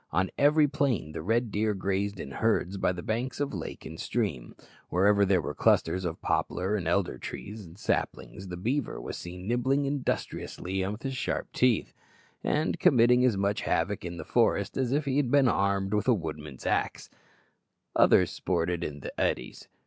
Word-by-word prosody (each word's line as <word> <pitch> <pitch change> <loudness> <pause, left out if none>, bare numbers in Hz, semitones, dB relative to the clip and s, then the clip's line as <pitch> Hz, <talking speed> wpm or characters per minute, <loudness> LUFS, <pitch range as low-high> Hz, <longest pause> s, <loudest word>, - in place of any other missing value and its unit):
On 95 +4 0
every 150 +1 +5
plain 135 - 0
the 80 - -5
red 115 +5 0
deer 105 +1 0
grazed 100 +1 -1
in 70 - -6
herds 100 +1 0
by 95 - +1
the 90 -1 -6
banks 120 +3 -2
of 145 -3 -1
lake 90 -5 -6
and 80 0 -8
stream. 95 - -2 0.3
Wherever 100 +2 +4
there 95 -2 +3
were - - -3
clusters 95 0 +2
of 85 -1 -4
poplar 95 +4 0
and 90 -6 -2
elder 85 -7 0
trees 105 +1 -7
and 85 +2 -14
saplings, 95 -2 -2
the 90 -1 -6
beaver 130 +10 -1
was - - -6
seen 90 +2 -8
nibbling 130 +4 +1
industriously 95 -8 -2
with 105 +3 -5
his 135 -1 -3
sharp - - -2
teeth, 125 -4 +2 0.5
and 155 +2 0
committing 125 -6 +5
as 120 -6 +3
much 100 +1 0
havoc - - 0
in 85 -1 -5
the 80 - -6
forest 110 -4 +1
as 130 -2 0
if 145 +2 +1
he 135 -1 0
had 140 -4 +2
been 140 0 +5
armed 100 -2 +1
with 105 - +1
the 125 - +4
woodman's 75 - -6
axe; - - -1 0.8
others - - +5
sported 85 -1 -1
in 75 -2 -5
the - - -6
eddies. - - -2
100 Hz, 180 wpm, -28 LUFS, 90-125 Hz, 0.8 s, every